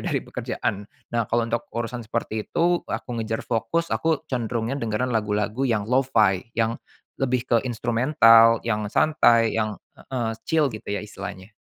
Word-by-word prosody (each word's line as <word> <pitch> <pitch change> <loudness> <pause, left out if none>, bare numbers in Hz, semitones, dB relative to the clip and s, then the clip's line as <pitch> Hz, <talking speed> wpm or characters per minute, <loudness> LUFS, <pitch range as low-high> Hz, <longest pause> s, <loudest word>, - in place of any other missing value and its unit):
dari - - -2
pekerjaan. 100 -1 -4 0.2
Nah, 115 -2 0
kalau 120 0 +1
untuk 115 0 -3
urusan 120 +1 -4
seperti 110 -1 -4
itu 175 +1 +2
aku - - -4
ngejar 110 0 -3
fokus, 140 +10 -1
aku 160 -1 0
cenderungnya 120 -3 -2
dengerin 115 +2 -1
lagu-lagu 105 +4 0
yang 110 -4 0
lo-fi, 115 -5 +2
yang 115 0 0 0.4
lebih 125 -2 0
ke 120 - +2
instrumental, 115 -1 +5
yang 105 -2 -1
santai, 115 -4 +3
yang 110 -2 -1 0.2
heeh 120 -4 -3 0.2
chill 150 -6 +2
gitu 110 - -9
ya 105 +1 -2
istilahnya. 100 -1 -9
115 Hz, 150 wpm, -24 LUFS, 110-125 Hz, 0.4 s, instrumental